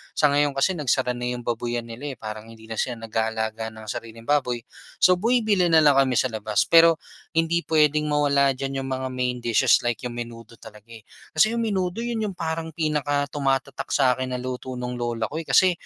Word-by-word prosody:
sa 150 - +4
ngayon 145 0 +2
kasi 175 +6 +1
nagsara 130 -3 +1
na 125 - -4
yung 125 0 -3
babuyan 120 0 -3
nila, 135 +5 -6
eh. - - -37
Parang 110 0 -6
hindi 110 0 -15
na 110 - -5
sila 120 -3 -2
nag-aalaga 110 0 -2
ng 110 -1 -10
sariling 115 +1 -7
baboy 125 -5 +1 0.4
so, 180 0 +6
bumibili 220 -3 +2
na 160 - +7
lang 145 -2 +5
kami 135 -2 +3
sa 130 - +2
labas. 110 -2 -1
Pero, 165 0 +6 0.3
hindi 165 +1 +1
puwedeng 150 -1 +3
mawala 140 -2 +3
diyan 135 +1 -4
yung 135 - -5
mga 130 0 -3
main 125 -1 -2
dishes 120 +1 +3
like 120 -1 -2
yung 120 - -8
menudo 115 -1 -8
talaga, 105 0 -15
eh. 115 - -11 0.3
Kasi 160 +8 +4
yung 230 - 0
menudo, 195 0 -1
'yon 230 -3 -2
yung - - -13
parang 160 0 -3
pinakatumatatak 145 -3 -1
sa 130 -3 +4
'kin 130 0 -2
na 125 - -3
luto 130 0 -5
ng 125 0 -4
lola 115 -2 -2
ko, - - -7
eh. 165 - -8
Kasi 185 -1 +5
130 Hz, 205 wpm, -24 LUFS, 115-155 Hz, 0.4 s, na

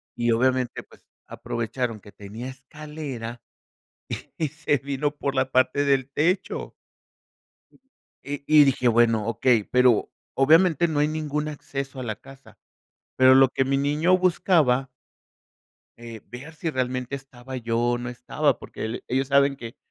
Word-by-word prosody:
y 120 0 +1
obviamente, 125 +1 0
pues - - -22 0.2
aprovecharon 115 0 -4
que 105 - -15
tenía 105 +5 -8
escalera, 135 -3 -8 1.0
y 160 - 0
se 155 0 0
vino 140 +2 -3
por 140 -1 -3
la 130 0 0
parte 130 +2 +2
del 135 -2 +1
techo. 180 +7 -1 1.5
Y 140 0 -5
y 155 -1 +7
dije: 130 -2 +1
"Bueno, 115 -2 +3
okey". 115 -1 +2
Pero 125 -2 +3 0.2
obviamente, 160 +3 +4
no 155 -3 -1
hay 150 - +3
ningún 155 -1 -3
acceso 140 -2 -6
a - - -4
la 110 -2 -3
casa, 135 +4 -16 0.6
pero 130 0 +6
lo 135 0 +7
que 135 - 0
mi 135 +1 +1
niño 150 +6 +2
buscaba. 160 -8 +2 1.1
Eh, 115 -2 -10
ver 140 +7 -10
si 160 +1 -3
realmente 130 -1 -2
estaba 130 -1 -9
yo 115 -2 -2
o 120 0 +1
no 120 0 -5
estaba, 125 +3 -1
porque - - -8
el 110 +2 -5
ellos 130 +1 0
saben 140 0 +3
que, 115 -1 -9
135 Hz, 150 wpm, -24 LUFS, 120-145 Hz, 1.5 s, y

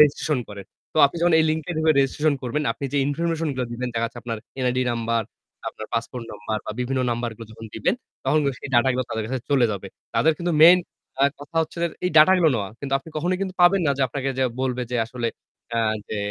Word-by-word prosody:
registration 150 -1 +4
করেন। 100 -2 -8 0.3
তো - - -11
আপনি 140 - -8
যখন 175 -1 +4
এই 160 - +4
link 155 0 -1
এ - - 0
ঢুকে 160 0 +4
registration 145 +2 +1
করবেন, 130 +5 -1
আপনি 140 - -8
যে - - 0
information 165 +2 -1
গুলো 125 -1 -1
দিবেন 125 +1 -3
দেখা 115 0 0
যাচ্ছে 120 - -10
আপনার 115 -1 -3 0.3
NID 125 0 +1
number, 115 -1 0 0.5
আপনার 110 - -8
passport 115 +1 -3
number 110 +1 -4
বা - - -3
বিভিন্ন 130 +1 -1
number 120 0 -2
গুলো 115 0 -9
যখন 115 0 -10
দিবেন 110 - +1 0.3
তখন 155 - +3 0.2
সেই - - -7
data 120 +2 +5
গুলো 130 0 0
তাদের 110 -1 -2
কাছে 130 +1 -3
চলে 135 -4 +4
যাবে। 100 - -6 0.3
তাদের 160 - +4
কিন্তু 175 0 0
main 175 +2 +9 0.4
আ - - +6 0.2
কথা 155 +3 -10
হচ্ছে 160 - -8 0.3
এই 180 - +2
data 155 +5 +8
গুলো 165 -3 +5
নেওয়া। 100 -3 -2
কিন্তু 140 -1 -5
আপনি 135 - -14
কখনোই 180 +4 0
কিন্তু 190 -1 -3
পাবেন 185 +2 +6
না 140 - +3
যে - - +2
আপনাকে 135 +2 -3
যে 130 - +3 0.2
বলবে 125 -1 -1
যে - - +1
আসলে 120 -1 -3 0.5
আ - - +2 0.3
যে 110 - -3
130 Hz, 230 wpm, -23 LUFS, 115-155 Hz, 0.5 s, main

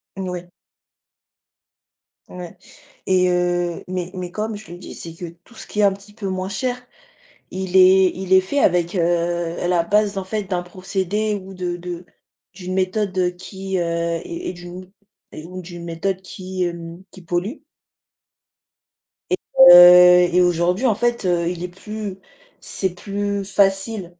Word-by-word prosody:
N 190 -1 -4
ouais. 180 -1 -6 1.8
Ouais 180 +1 -10 0.5
et 185 -1 +3
heu, 175 -1 -1
mais 180 -1 -4
mais 180 -2 -6
comme 215 +2 -4
je 210 -4 -13
le 175 - -8
dis, 180 - -10
c'est 165 - -8
que 170 0 -7 0.2
tout 235 - -19
ce - - -9
qui 210 - -6
est - - +4
un 200 -1 +4
petit 200 +1 -14
peu 205 -2 -6
moins 185 0 -3
cher, 245 +4 -2 0.7
il 190 0 -3
est 185 0 +6
il 190 0 -4
est 190 - +8
fait 235 +10 -3
avec, 175 -3 +2
heu, - - +2 0.7
la 175 -1 +2
base 210 +1 +1
en 195 - -3
fait 210 +2 -3
d'un 180 -2 -2
procédé 190 +3 -2
ou 190 - -10
de 180 -2 -4
de 175 0 -7 0.5
d'une 185 -1 -7
méthode 185 -1 -1
qui, 190 +1 -6
heu, - - +1
est 170 - -3
est - - -3
d'une 175 0 -10
ou 190 - -25 0.5
ou 185 +1 -8
d'une 175 -1 -9
méthode 180 +3 -3
qui, 185 0 -5
hem, 170 0 -6
qui 190 - -14
pollue. 175 - -3 1.7
Et - - +2 0.2
heu, 180 0 +9
et - - +6
aujourd'hui 180 +5 +1
en 225 -5 +3
fait, 240 -1 -1
heu, 175 -1 +1
il 175 -1 -5
est - - -2
plus 205 +2 -7 0.4
c'est 190 -2 -3
plus 200 +1 -3
facile, 195 +1 +1
185 Hz, 165 wpm, -21 LUFS, 175-195 Hz, 1.8 s, heu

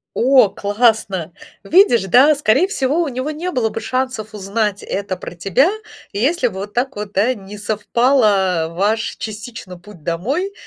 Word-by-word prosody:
О, 255 -3 +5
классно! 205 -5 0 0.3
Видишь, 335 - +4
да, 255 - +5
скорее 285 +5 +2
всего, 295 -4 0
у 335 - -1
него 260 +2 -3
не 325 +4 -4
было 240 -8 0
бы 225 - -5
шансов 255 -5 -3
узнать 205 0 -2
это 195 -2 -4
про - - -8
тебя, 195 - +2 0.4
если 260 +6 +1
бы 190 - -8
вот 205 +1 -7
так 260 +3 -1
вот, 205 0 -6
да, 215 +7 +2
не 205 -2 -11
совпало 205 -4 +1
ваш 205 +6 -1
частично 215 -4 -8
путь 175 -3 -15
домой, 260 - -2
220 Hz, 155 wpm, -18 LUFS, 200-260 Hz, 0.4 s, О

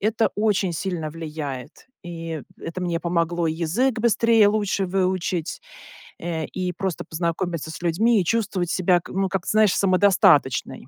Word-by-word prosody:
это 220 +2 +1
очень 205 -4 +1
сильно 165 -3 -3
влияет. 150 - -7 0.2
И 165 -4 -6 0.2
это 170 +2 -6
мне 170 -2 -1
помогло 170 -1 0
и 160 - 0
язык 205 +10 0
быстрее 230 -1 +4
и - - +7
лучше 205 -2 0
выучить, 185 -3 -1 0.6
э, 165 -2 -3
и 180 +3 -3
просто 190 -1 -3
познакомиться 170 -1 -3
с 160 - -9
людьми, 205 +6 +2
и - - -3
чувствовать 190 -4 0
себя 180 -1 +2
к - - -13
ну, 195 0 +1
как-то, 190 -2 -3
знаешь, 215 -3 +4
самодостаточной. 185 - +3
180 Hz, 155 wpm, -23 LUFS, 165-200 Hz, 0.6 s, и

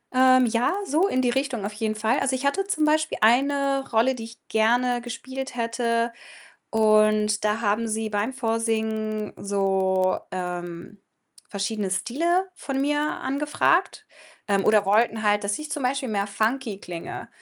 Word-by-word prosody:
Ähm, 255 0 +6
ja, 235 +9 +1
so 340 +5 +2
in 255 -6 0
die 245 - +2
Richtung 265 -5 -2
auf 210 - -4
jeden 215 0 -2
Fall. 220 +5 +1
Also, 260 -1 0
ich 265 +2 -4
hatte 390 +8 0
zum 310 -6 +1
Beispiel 310 +1 +1
eine 275 +4 +2
Rolle, 230 +4 +3
die 230 -3 -7
ich 230 0 -15
gerne 240 +3 +2
gespielt 260 +2 -6
hätte 230 0 -1 0.6
und 215 -1 +3
da 210 +2 +1
haben 220 +1 0
sie 220 0 -2
beim 210 +4 -1
Vorsingen 220 -3 -2
so, 190 -2 +1
ähm, 180 +1 -6 0.5
verschiedene 200 0 -2
Stile 335 - 0
von 275 -6 -4
mir 295 +1 +1
angefragt, 300 +5 0 0.4
ähm, 200 -1 +1
oder 210 -2 +4
wollten 220 +1 +2
halt, 205 0 +2
dass 205 +4 -1
ich 305 - -7
zum 290 - -3
Beispiel 260 0 -1
mehr 205 -1 -1
funky 220 +1 -1
klinge 175 -4 -7
230 Hz, 155 wpm, -24 LUFS, 210-265 Hz, 0.6 s, Ähm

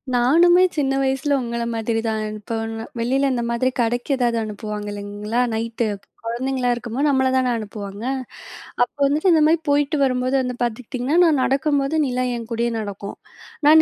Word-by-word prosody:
நானுமே 340 +9 +5
சின்ன 270 -3 +1
வயசுல 270 +1 +1
உங்கள்ல 235 -1 -3
மாதிரி 225 0 -1
தான் 220 -1 -1
அனுப்ப 215 +2 -5 0.4
வெளியில 270 +4 +1
இந்த 240 -1 -1
மாதிரி 235 +2 +1
கடைக்கு 240 +3 0
ஏதாவது 240 -2 +1
அனுப்புவாங்க 210 0 -5
இல்லங்களா, 205 +3 -4
நைட்டு. 230 0 -1 0.4
குழந்தைங்களா 250 +2 -1
இருக்கும்போது 240 +4 -2
நம்மள 265 -1 +3
தானே 255 -1 +2
அனுப்புவாங்க. 205 -1 -7 0.8
அப்போ 250 - -5
வந்துட்டு 310 +6 +3
இந்த 310 -1 +4
மாதிரி 325 +1 +3
போயிட்டு 290 +1 +2
வரும்போது 255 0 +1
வந்து 250 -1 -3
பாத்துக்கிட்டிங்கன்னா, 250 +5 -2
நான் 300 -5 +3
நடக்கும்போது 280 +2 +1
நீலா 255 0 -1
என் 230 -1 -7
கூடயே 235 +1 0
நடக்கும். 200 -1 -6 0.5
நான் 315 +1 +8
245 Hz, 150 wpm, -21 LUFS, 225-275 Hz, 0.8 s, நான்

